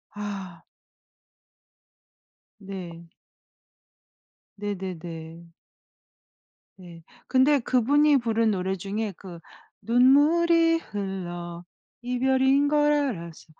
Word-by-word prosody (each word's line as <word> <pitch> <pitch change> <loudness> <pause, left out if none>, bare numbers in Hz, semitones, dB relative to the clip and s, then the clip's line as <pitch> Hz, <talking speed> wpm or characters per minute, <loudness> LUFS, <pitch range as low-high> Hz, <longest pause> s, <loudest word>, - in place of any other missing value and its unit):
아. 195 -4 -7 2.0
네. 180 -4 -9 1.5
네네네. 170 -4 -7 1.3
네. 170 -2 -13 0.2
근데 270 +3 +4
그분이 280 +5 +3
부른 230 -2 +1
노래 190 -1 -2
중에 200 +3 -4
그 180 -3 -11 0.4
눈물이 330 +7 +4
흘러 175 - -6 0.4
이별인 265 +3 +2
걸 295 0 +3
알았어. 205 - -3
210 Hz, 130 characters per minute, -25 LUFS, 180-265 Hz, 2.0 s, 근데